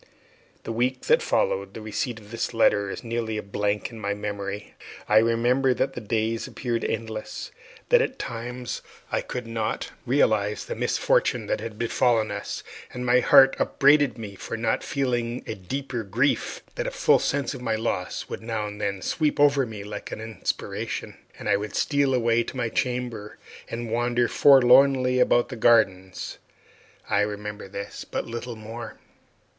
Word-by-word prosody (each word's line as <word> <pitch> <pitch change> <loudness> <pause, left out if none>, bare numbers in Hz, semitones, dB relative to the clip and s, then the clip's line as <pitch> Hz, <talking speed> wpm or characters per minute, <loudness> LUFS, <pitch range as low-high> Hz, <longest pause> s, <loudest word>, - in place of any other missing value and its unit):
The - - -4
week 125 +3 0
that 475 - +3
followed - - 0
the 110 - -6
receipt 115 +2 -3
of 105 0 -16
this 115 0 -3
letter 100 -3 +3
is - - -6
nearly 115 -2 -2
a 105 - -4
blank 105 +2 -1
in 115 - -9
my 100 -1 -2
memory. 100 0 -5 0.3
I 105 - +5
remember 120 +3 +2
that 135 - 0
the 125 - -6
days 110 +1 -1
appeared 120 -2 -3
endless; 110 -1 -4 0.4
that - - +6
at 265 - -2
times 120 +1 -5 0.3
I - - +1
could 125 -1 -5
not 115 -1 -3 0.2
realize 110 -5 +2
the - - -4
misfortune - - +1
that - - -1
had 110 -2 -6
befallen 115 -2 +2
us, 100 0 -5 0.3
and 125 0 -5
my 125 0 +5
heart 135 +1 +7
upbraided 145 -1 +4
me 105 -3 -7
for 105 +3 -6
not 115 0 0
feeling 120 -3 -1
a - - -4
deeper 120 +6 -4
grief; 115 +7 0
that - - -3
a - - +1
full - - +3
sense 140 -3 -1
of - - -8
my 115 -3 0
loss 110 -5 -2
would - - -6
now 110 -2 -2
and 105 0 -7
then 100 -2 -2
sweep 150 -2 0
over 140 -3 +4
me 105 -2 -7
like 105 0 -7
an - - -5
inspiration, 110 0 -4 0.2
and - - -7
I 100 - +4
would 105 0 -5
steal 140 -2 +2
away 120 -1 +3
to 130 - -7
my 120 -2 0
chamber 120 -4 -3 0.3
or 115 +1 -3
wander 120 +1 +1
forlornly 130 -1 +6
about 120 -1 +3
the 130 - -5
gardens. 95 -5 +2 0.7
I - - +2
remember 105 0 -3
this, 100 +1 -6
but - - -4
little 120 +1 -5
more. 110 0 -8
115 Hz, 170 wpm, -25 LUFS, 105-125 Hz, 0.7 s, heart